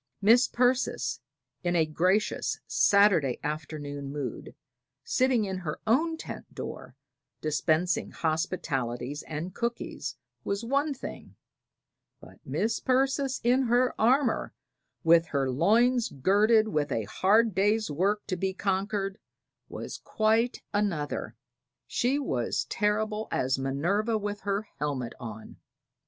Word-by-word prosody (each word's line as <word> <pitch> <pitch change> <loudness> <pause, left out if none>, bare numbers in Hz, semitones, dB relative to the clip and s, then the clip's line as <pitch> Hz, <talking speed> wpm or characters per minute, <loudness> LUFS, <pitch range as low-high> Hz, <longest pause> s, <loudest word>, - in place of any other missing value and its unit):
Mis' 230 +5 +5
Persis, 250 +1 +1 0.4
in 175 0 0
a 165 -2 +4
gracious 180 +7 0
Saturday 200 - +4
afternoon 145 -2 -5
mood, 140 -5 -5 0.5
sitting 255 -4 +2
in 190 -1 -3
her 155 -4 -5
own 320 +9 +2
tent - - -8
door - - -7 0.4
dispensing 155 +3 +1
hospitalities 145 -5 -2
and 160 +4 -5
cookies, 235 - -4 0.3
was 200 +3 -2
one 280 +5 +1
thing; 260 - -9 0.8
but - - -15
Mis' 225 +2 -1
Persis 265 +1 +1
in 250 +3 +4
her 245 +2 +3
armor, 250 +1 +2 0.5
with 165 0 +5
her 135 -3 0
loins 230 - +3
girded 210 - +3
and 150 -9 -1
a 115 - 0
hard 215 - +3
day's 205 +1 +1
work 195 +7 0
to 185 - -2
be 190 +1 -2
conquered, 195 +1 -1 0.5
was - - -6
quite 225 +3 +1
another: 185 -8 -1 0.5
she 255 +4 0
was 130 - -1
terrible 215 +1 0
as 130 +1 0
Minerva 175 - 0
with 205 -1 -4
her 200 +1 -1 0.2
helmet 140 -5 -2
on. 110 -3 -9
195 Hz, 115 wpm, -28 LUFS, 150-225 Hz, 0.8 s, Mis